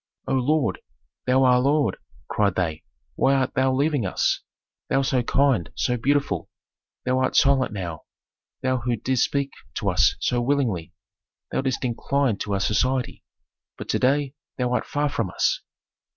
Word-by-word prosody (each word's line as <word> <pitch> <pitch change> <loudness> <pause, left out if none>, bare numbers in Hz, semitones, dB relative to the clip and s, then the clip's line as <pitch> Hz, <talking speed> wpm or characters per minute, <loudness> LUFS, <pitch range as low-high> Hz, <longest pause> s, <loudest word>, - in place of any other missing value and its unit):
"O - - 0
lord! 140 +3 +1 0.5
thou 130 +1 +4
our 125 -1 +5
lord!" 140 +3 +2 0.3
cried 100 -3 +1
they, 80 -4 -1 0.3
"why 135 +1 +3
art 130 -1 0
thou 130 0 +2
leaving 140 0 +1
us? 95 - 0 0.5
Thou 135 0 +2
so 130 -1 +1
kind, 120 - +2
so 125 - 0
beautiful. 140 +4 0 0.6
Thou 130 0 +2
art 130 - 0
silent 135 -3 +4
now, 85 -7 -5 0.6
thou 130 0 +1
who 120 0 -1
didst 125 +3 +1
speak 140 -1 -2 0.2
to - - 0
us - - +3
so 120 -1 0
willingly. 120 -11 0 0.6
Thou - - 0
didst 130 -1 -1
incline 125 0 0
to 105 - -3
our - - 0
society, 125 +6 0 0.5
but - - -8
to - - +1
day 140 +1 +2 0.2
thou 125 -2 0
art 125 - -1
far 145 0 0
from 115 -8 -2
us." - - 0
130 Hz, 160 wpm, -24 LUFS, 115-140 Hz, 0.6 s, our